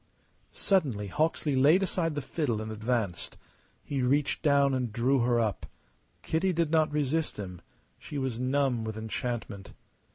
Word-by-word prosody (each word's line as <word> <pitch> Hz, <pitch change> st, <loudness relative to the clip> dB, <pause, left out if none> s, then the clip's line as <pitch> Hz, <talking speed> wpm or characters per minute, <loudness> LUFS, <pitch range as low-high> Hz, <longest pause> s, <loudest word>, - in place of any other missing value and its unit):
Suddenly 130 Hz, -, 0 dB
Hawksley 155 Hz, -, 0 dB
laid 150 Hz, +9 st, +5 dB
aside 165 Hz, -4 st, -1 dB
the 145 Hz, -, -3 dB
fiddle 130 Hz, -7 st, -1 dB
and 110 Hz, 0 st, -5 dB
advanced. 110 Hz, -4 st, -2 dB, 0.5 s
He 140 Hz, -2 st, -2 dB
reached 140 Hz, +3 st, +1 dB
down 140 Hz, -3 st, +4 dB
and 125 Hz, -3 st, -1 dB
drew 125 Hz, +5 st, +2 dB
her 120 Hz, 0 st, +2 dB
up. 110 Hz, -4 st, -1 dB, 0.6 s
Kitty 175 Hz, +4 st, +1 dB
did 165 Hz, -2 st, 0 dB
not 160 Hz, -2 st, +3 dB
resist 150 Hz, +2 st, 0 dB
him; 90 Hz, -4 st, -7 dB, 0.4 s
she 145 Hz, -, -7 dB
was 130 Hz, -4 st, -2 dB
numb 130 Hz, -2 st, +1 dB
with 110 Hz, -1 st, -4 dB
enchantment. 110 Hz, -2 st, -4 dB
130 Hz, 150 wpm, -29 LUFS, 110-150 Hz, 0.6 s, laid